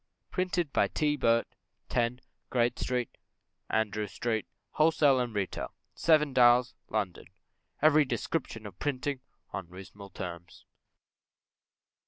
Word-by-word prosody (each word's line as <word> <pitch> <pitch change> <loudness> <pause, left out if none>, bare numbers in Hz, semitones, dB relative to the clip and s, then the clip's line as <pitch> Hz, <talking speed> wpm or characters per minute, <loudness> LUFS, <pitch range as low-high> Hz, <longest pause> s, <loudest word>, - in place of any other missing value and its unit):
Printed 180 -4 -1
by - - +3
T. 150 -1 +1
Birt, 115 -4 +2 0.4
10, 120 +1 0 0.3
Great 120 -1 +1
St. 125 -2 -1 0.6
Andrew 105 -1 0
Street, 110 +2 -2 0.2
Wholesale 150 -4 +4
and 120 -3 -2
Retail, 100 -3 -3 0.2
Seven 150 -4 +3
Dials, 125 0 +5 0.2
London. 100 -5 -2 0.6
Every 155 0 +6
Description 125 -5 -3
of 95 -3 -10
Printing 145 -1 -2 0.3
on 90 -3 -5
Reasonable 95 +2 -11
Terms. 85 -2 -8
120 Hz, 110 wpm, -30 LUFS, 105-145 Hz, 0.6 s, Every